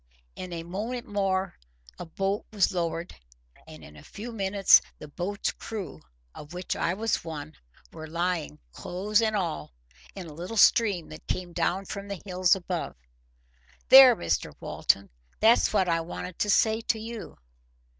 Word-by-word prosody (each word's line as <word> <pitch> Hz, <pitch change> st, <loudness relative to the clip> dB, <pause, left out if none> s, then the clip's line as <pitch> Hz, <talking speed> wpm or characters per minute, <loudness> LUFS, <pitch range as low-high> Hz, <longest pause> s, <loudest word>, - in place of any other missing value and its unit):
In 185 Hz, -1 st, -7 dB
a 165 Hz, -1 st, -5 dB
moment 220 Hz, +8 st, -5 dB
more 195 Hz, -2 st, -1 dB, 0.4 s
a -, -, -7 dB
boat 195 Hz, +4 st, -2 dB
was 205 Hz, -2 st, +2 dB
lowered, 170 Hz, -1 st, -3 dB, 0.5 s
and 80 Hz, 0 st, -12 dB
in 75 Hz, +1 st, -13 dB
a -, -, -13 dB
few 225 Hz, +4 st, -8 dB
minutes 195 Hz, -2 st, +5 dB, 0.2 s
the 150 Hz, -, -10 dB
boat's 180 Hz, +7 st, -3 dB
crew, 190 Hz, -, -7 dB, 0.3 s
of 150 Hz, +3 st, -11 dB
which 180 Hz, 0 st, -3 dB
I 170 Hz, -, -1 dB
was 225 Hz, +2 st, -1 dB
one, 155 Hz, -2 st, -7 dB, 0.4 s
were 155 Hz, -, -8 dB
lying, 170 Hz, -, -2 dB
clothes 200 Hz, -, -1 dB
and 220 Hz, -1 st, +1 dB
all, 160 Hz, -, -3 dB, 0.4 s
in -, -, -7 dB
a 155 Hz, -, -10 dB
little 180 Hz, +8 st, -6 dB
stream 205 Hz, -7 st, +4 dB
that 155 Hz, -, -12 dB
came 180 Hz, -1 st, -3 dB
down 190 Hz, +3 st, -1 dB
from 200 Hz, +1 st, -7 dB
the 200 Hz, -2 st, -5 dB
hills 185 Hz, -1 st, +3 dB
above.—There, -, -, +2 dB
Mr 85 Hz, -, -2 dB
Walton! 100 Hz, 0 st, 0 dB, 0.3 s
that's 225 Hz, +2 st, +4 dB
what 190 Hz, -3 st, +2 dB
I 165 Hz, -1 st, +1 dB
wanted 175 Hz, +1 st, -7 dB
to 210 Hz, -, 0 dB
say 220 Hz, +2 st, +3 dB
to 225 Hz, -, 0 dB
you." 225 Hz, 0 st, -8 dB
185 Hz, 155 wpm, -27 LUFS, 160-205 Hz, 0.5 s, minutes